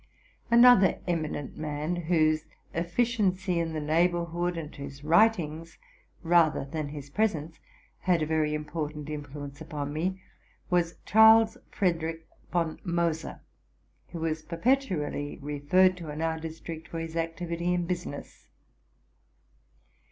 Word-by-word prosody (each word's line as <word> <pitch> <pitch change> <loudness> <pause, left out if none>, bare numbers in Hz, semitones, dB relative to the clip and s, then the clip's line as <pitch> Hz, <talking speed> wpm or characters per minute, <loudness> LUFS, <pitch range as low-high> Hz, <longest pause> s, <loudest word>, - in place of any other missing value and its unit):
Another 235 -4 +7
eminent 155 -5 -3
man, 155 +2 -2
whose 155 -2 +1 0.3
efficiency 185 0 0
in 165 -1 -1
the 155 - -2
neighbor 170 +3 +2
hood 175 +1 -2
and 155 -2 -6
whose 140 0 -9
writings, 165 -2 +2 0.5
rather 165 -4 +3
than 150 +1 -4
his 145 -1 -8
presence, 165 -5 -1 0.4
had 175 -3 +2
a - - +1
very 155 -1 +1
important 150 -1 -5
influence 145 -1 -7
upon 145 -2 -5
me, 185 +5 -2 0.5
was 175 -1 +2
Charles 220 +1 +7
Frederick 165 -3 -1 0.3
von 170 -3 -1
Moser, 170 -3 -1 0.7
who 165 - -7
was 160 -1 -1
perpetually 170 - -1
referred 150 +6 +3
to 165 -3 -8
in 150 +1 -6
our 160 0 -1
dis 160 0 -7
trict 160 -1 -8
for 165 - -6
his 165 0 -5
activity 170 +1 -2
in 175 -1 0
business. 175 -5 -6
165 Hz, 125 wpm, -28 LUFS, 155-175 Hz, 0.7 s, Another